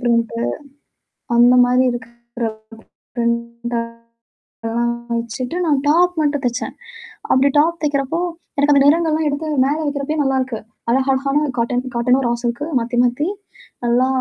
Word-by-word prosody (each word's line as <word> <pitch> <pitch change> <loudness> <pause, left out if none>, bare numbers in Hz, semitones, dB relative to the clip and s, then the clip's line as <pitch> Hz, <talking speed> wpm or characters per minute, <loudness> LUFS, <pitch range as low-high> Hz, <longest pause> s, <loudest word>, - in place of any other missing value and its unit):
Print 235 -2 +1 1.0
அந்தமாரி 245 +1 +5
இருக்கிற 235 0 -7 0.7
print 235 0 -2 0.9
எல்லாம் 235 +1 0 0.3
வச்சிட்டு 245 +6 -4
நான் 290 -3 +2
டாப் 355 +3 +4
மட்டும் 290 -2 0
தெச்சேன். 240 0 -2 0.6
அப்பிடி 275 +1 +4
டாப் 335 +3 +2
தெக்கிறப்போ, 285 +2 0 0.4
எனக்கு 290 +1 +4
அந்த 275 -1 +5
நிறங்கள் 325 +2 +4
எல்லாம் 310 0 +1
எடுத்து 290 +2 -3 0.2
மேல 290 +2 0
வைக்கிறப்பயே 290 +1 -1
நல்லா 270 -1 +1
இருக்கு. 255 -4 -4 0.3
அழகா 265 +3 +2
அழகான 275 +3 +1
காட்டன், 245 +2 0
காட்டன்னும் 250 +2 +2
ரா - - +1
சில்க் 240 +3 -2 0.2
மாத்தி 235 +1 -4
மாத்தி. 250 +6 0 0.6
நல்லா. 240 +2 +3
255 Hz, 130 wpm, -19 LUFS, 235-290 Hz, 1.0 s, அந்தமாரி